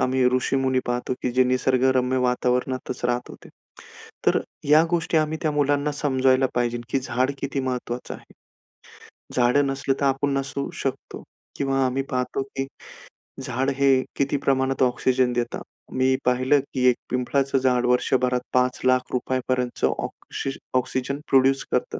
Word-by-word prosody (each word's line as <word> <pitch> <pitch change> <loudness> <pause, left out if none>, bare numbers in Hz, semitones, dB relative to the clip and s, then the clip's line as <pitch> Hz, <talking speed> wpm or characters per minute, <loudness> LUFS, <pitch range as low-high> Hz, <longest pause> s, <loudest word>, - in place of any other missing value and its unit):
आम्ही 130 0 +2
ऋषीमुनी 130 0 +1
पाहतो, 125 +1 -2
की 125 - 0
जे 130 +1 +4
निसर्गरम्य 130 0 +2
वातावरणातच 125 0 -1
राहतात 125 0 -2
आहे. - - -14 0.8
तर - - +4 0.3
या 155 +2 +7
गोष्टी 165 -1 0
आम्ही 155 0 +1
त्या 155 - +1
मुलांना 145 0 +1
समजायला 130 -2 +2
पाहिजे, 120 -1 0
की 135 - +1
झाड 130 +1 0
किती 140 0 -2
महत्त्वाचं 125 -1 -4
आहे. - - -15 1.0
झाडं 125 +3 +3
नसलं 135 0 -1
तर 140 - +1
आपण 135 +1 +1
नसू 140 0 -3
शकतो 135 -1 -5 0.3
किंवा 135 -1 +1
आम्ही 130 +2 -1
पाहतो, 125 0 -1
की 135 0 -5 0.7
झाड 130 +1 -1
हे 135 -1 +4
किती 140 +1 0
प्रमाणात 135 -1 +1
ऑक्सिजन 125 0 +2
देतं. 120 0 -2 0.3
मी 130 0 +2
पाहिलं, 130 +3 +3
की 130 -2 0
एक 125 - +2
पिंपळाचं 135 +2 0
झाड 125 -2 +2
वर्षभरात 125 0 +2
5 125 0 +2
लाख 130 0 +2
रुपये 130 +1 -1
पर्यंतचं 125 -1 0
ऑक्सी 135 - -5 0.3
ऑक्सिजन 130 +2 -2
प्रोड्यूस 135 0 +4
करतं. - - -1
130 Hz, 145 wpm, -24 LUFS, 125-135 Hz, 1.0 s, या